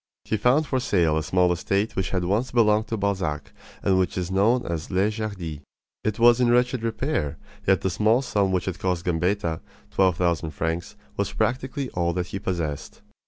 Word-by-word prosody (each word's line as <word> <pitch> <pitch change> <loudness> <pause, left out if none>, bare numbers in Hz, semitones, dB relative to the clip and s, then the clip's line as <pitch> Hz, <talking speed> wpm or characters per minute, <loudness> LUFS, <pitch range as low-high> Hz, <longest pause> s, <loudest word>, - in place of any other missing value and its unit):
He - - 0
found 125 +8 +3
for 130 -3 0
sale 85 -10 +2
a 80 - +1
small 90 +3 +2
estate 100 +5 -1
which 95 - -1
had 90 -2 -1
once 105 +8 0
belonged 110 -2 +3
to 115 - -2
Balzac, 95 -8 -2 0.3
and 95 -1 +3
which 90 0 0
is 90 0 -2
known 110 +6 +2
as 80 -2 -4
Les 95 +3 +2
Jardies. 100 -8 -5 0.4
It 110 -1 -1
was 120 +1 +5
in 120 - +4
wretched 125 0 +2
repair; 115 - -2 0.3
yet 95 0 +4
the 95 - 0
small 110 +7 +2
sum 100 -6 +1
which 90 -1 -1
it 95 - -3
cost 90 -2 -1
Gambetta 90 0 0 0.3
twelve 95 -3 +2
thousand 85 -3 0
francs 80 +1 -3 0.2
was - - -1
practically 130 +2 -1
all 85 -1 0
that 90 0 -1
he 95 - -5
possessed. 85 -7 -4
95 Hz, 190 wpm, -25 LUFS, 85-110 Hz, 0.4 s, was